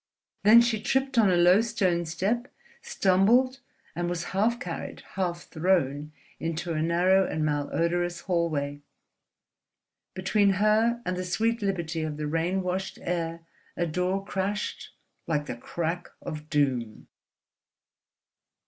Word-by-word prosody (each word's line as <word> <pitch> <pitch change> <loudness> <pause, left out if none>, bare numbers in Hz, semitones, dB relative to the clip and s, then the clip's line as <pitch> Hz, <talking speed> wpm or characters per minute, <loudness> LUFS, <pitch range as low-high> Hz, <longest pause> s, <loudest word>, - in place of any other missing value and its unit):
Then 220 +3 +8
she 230 -3 0
tripped 265 +2 +1
on 210 -4 +5
a 180 - +3
low 180 +4 +6
stone 180 -7 0
step, 205 +10 -1 0.3
stumbled, 250 - +3 0.4
and 175 0 -1
was 175 -1 -2
half 225 +5 +1
carried, 250 - -6
half 175 -2 -2
thrown 155 -4 0 0.3
into 165 +1 -3
a 155 - -1
narrow 180 +4 +3
and 155 0 -1
malodorous 170 +4 -1
hallway. 155 -5 -1 1.3
Between 195 +1 +2
her 220 +4 +2
and 180 - -1
the 185 - -3
sweet 225 +6 0
liberty 170 -5 -2
of 155 -1 -3
the 150 - -3
rain 165 +5 0
washed 185 +1 -3
air 170 -1 -2 0.4
a 175 - +1
door 180 +4 -1
crashed 200 +2 -3 0.4
like 150 -3 0
the - - -5
crack 170 +7 -4
of 155 0 -7
doom. 130 -7 0
180 Hz, 130 wpm, -27 LUFS, 165-200 Hz, 1.3 s, Then